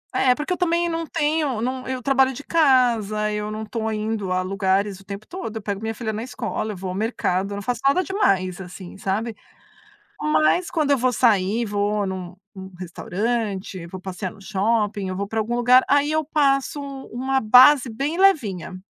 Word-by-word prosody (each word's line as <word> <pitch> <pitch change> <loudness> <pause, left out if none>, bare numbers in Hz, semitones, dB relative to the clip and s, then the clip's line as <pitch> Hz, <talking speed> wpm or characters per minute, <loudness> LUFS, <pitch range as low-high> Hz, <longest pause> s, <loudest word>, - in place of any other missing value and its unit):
É, 250 -1 +4
porque 300 +6 -4
eu - - -4
também 345 0 +1
não 330 0 -2
tenho 300 -6 0
não 255 +2 -3
eu 260 -1 -3
trabalho 265 -1 +3
de 275 +3 -8
casa, 235 -9 +2
eu 210 0 -3
não 215 +1 -5
tô 220 0 -3
indo 215 -3 -2
a 185 - +1
lugares 195 +1 0
o 195 - -18
tempo 200 +1 -7
todo. 350 - -6
Eu - - -5
pego 200 0 -4
minha 225 0 -3
filha 220 -2 -3
na 215 - -4
escola, 225 -4 -4
vou 185 0 -5
ao - - -3
mercado, 200 -3 -1
eu 200 - -3
não 205 - -5
faço 245 0 -2
nada 365 +7 +3
demais, 190 - 0
assim, 180 0 -10
sabe. 205 +4 -2 0.9
Mas 310 +3 +2
quando 300 -4 +1
eu 275 - +3
vou 255 +1 +1
sair, 220 -1 +2
vou 205 0 0
num 185 -1 -5 0.2
num 190 -1 -9
restaurante, 195 0 -3
vou 185 +1 -8
passear 185 0 -5
no 205 - -17
shopping, 205 0 0
eu 185 - -4
vou 200 0 -3
para 220 +1 -1
algum 235 +3 -2
lugar, 250 +1 +6
aí 285 +1 +3
eu 315 0 +1
passo 280 -1 +1 0.3
uma 265 +2 0
base 250 +4 +7
bem 280 +9 -2
levinha. 215 - +2
220 Hz, 195 wpm, -22 LUFS, 195-265 Hz, 0.9 s, base